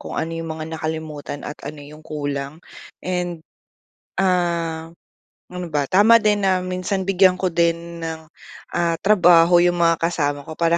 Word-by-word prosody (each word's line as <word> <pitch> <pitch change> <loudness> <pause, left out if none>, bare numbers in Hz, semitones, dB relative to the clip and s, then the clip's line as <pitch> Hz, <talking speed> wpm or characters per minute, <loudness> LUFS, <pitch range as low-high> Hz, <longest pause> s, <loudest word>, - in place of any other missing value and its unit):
kung - - -7
ano 165 - -2
'yung 165 0 -5
mga 160 0 -5
nakalimutan 155 -2 -5
at 150 - -6
ano 145 +1 -7
'yung 150 +2 -13
kulang. 145 0 -4 0.4
And, 180 -2 -2 0.8
ah, 170 -3 0 0.6
ano 180 -1 -5
ba, 150 -3 0
tama 210 +5 +6
din 210 -1 +2
na 185 -1 +2
minsan 185 +2 -2
bigyan 185 -1 +4
ko 185 +1 -1
din 170 0 0
ng, 160 -1 -5 0.5
ah, 170 -1 +1
trabaho 175 -4 +5
'yung 175 0 +3
mga 165 0 +4
kasama 145 -4 -2
ko 160 - -7
para 170 0 +2
170 Hz, 155 wpm, -21 LUFS, 160-180 Hz, 0.8 s, tama